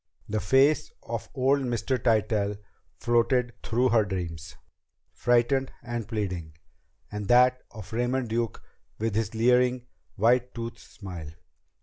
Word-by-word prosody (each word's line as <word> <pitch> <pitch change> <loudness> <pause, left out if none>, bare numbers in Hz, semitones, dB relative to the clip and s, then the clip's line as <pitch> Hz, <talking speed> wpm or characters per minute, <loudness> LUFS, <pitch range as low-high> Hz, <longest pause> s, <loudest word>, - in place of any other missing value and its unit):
The 110 +1 -1
face 135 +9 +3
of 115 -1 -5
old 135 +2 +3
Mr. 125 0 -1
Tytell 105 -3 +1 0.4
floated 120 +1 +2
through 125 +3 +1
her 115 -2 +4
dreams, 85 -5 -5 0.6
frightened 120 +2 +2
and 120 -3 -4
pleading, 90 -8 -4 0.6
and 105 -1 -4
that 125 +2 +5
of 110 -3 -10
Raymond 125 +2 0
Duke 115 0 -2 0.3
with 110 0 -1
his 110 +1 -1
leering, 125 +2 +3 0.3
white 120 +3 +2
toothed 115 0 -5
smile. 90 -7 -9
115 Hz, 120 wpm, -27 LUFS, 105-125 Hz, 0.6 s, that